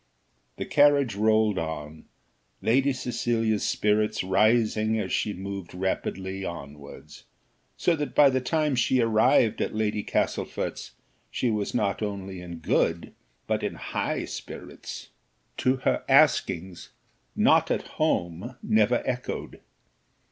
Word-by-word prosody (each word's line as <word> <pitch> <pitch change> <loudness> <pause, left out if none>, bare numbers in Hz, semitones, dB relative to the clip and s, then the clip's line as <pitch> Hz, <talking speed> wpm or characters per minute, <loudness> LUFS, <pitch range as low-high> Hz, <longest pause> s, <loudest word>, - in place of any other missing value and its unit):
The - - -4
carriage 145 -4 +4
rolled 110 0 +2
on, 80 -1 -6 0.5
Lady 135 +5 +2
Cecilia's 120 -4 -1
spirits 105 -1 +1
rising 110 +3 +2
as 95 -3 -3
she 105 - 0
moved 95 -2 -7
rapidly 95 +1 -3
onwards, 70 -5 -9 0.5
so 175 - +2
that 150 -4 -4
by 140 -2 +7
the 130 0 0
time 150 +2 0
she 130 +1 +2
arrived 115 0 +3
at - - -2
Lady 105 -1 0
Castlefort's - - -2 0.4
she 125 - -1
was 105 0 -2
not 105 -4 0
only 100 -3 -4
in 85 -1 -8
good 80 - 0 0.3
but - - -1
in - - -3
high - - -3
spirits. - - -8 0.5
To 130 +1 +2
her 130 - 0
askings, 90 +1 +2 0.5
"Not - - +4
at - - 0 0.2
home" 90 +8 -1
never 110 +3 +2
echoed. 125 -1 -4
110 Hz, 120 wpm, -26 LUFS, 95-125 Hz, 0.5 s, by